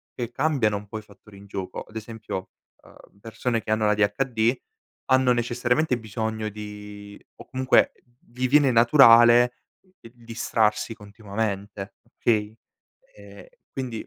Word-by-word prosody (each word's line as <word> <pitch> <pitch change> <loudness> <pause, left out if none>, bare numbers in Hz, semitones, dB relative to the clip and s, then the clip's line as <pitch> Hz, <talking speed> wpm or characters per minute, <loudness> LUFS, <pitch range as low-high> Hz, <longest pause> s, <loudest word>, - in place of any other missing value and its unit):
che 120 -1 -5
cambiano 125 -6 0
un 105 0 -10
po' 110 - -6
i - - -11
fattori 105 -1 -18
in 100 - -14
gioco. 95 -1 -6
Ad 110 - -15
esempio, 110 -4 -6 0.3
uhm, 100 - -20
persone 115 +2 -3
che 110 - -5
hanno 110 0 +1
l'ADHD 110 +3 +1 0.6
hanno 130 -1 +4
necessariamente 125 +3 0
bisogno 110 -1 -4
di 105 -1 -10 0.2
o - - -12
comunque 130 0 +2 0.4
vi 125 +1 -2
viene 145 +1 +4
naturale 120 -1 +6 0.5
il 115 - -14
distrarsi 115 -2 -1
continuamente, 100 -1 -5
okay? 110 -2 -1 0.6
Ehm, - - -14 0.3
quindi 125 -4 -5
110 Hz, 130 wpm, -24 LUFS, 105-120 Hz, 0.6 s, naturale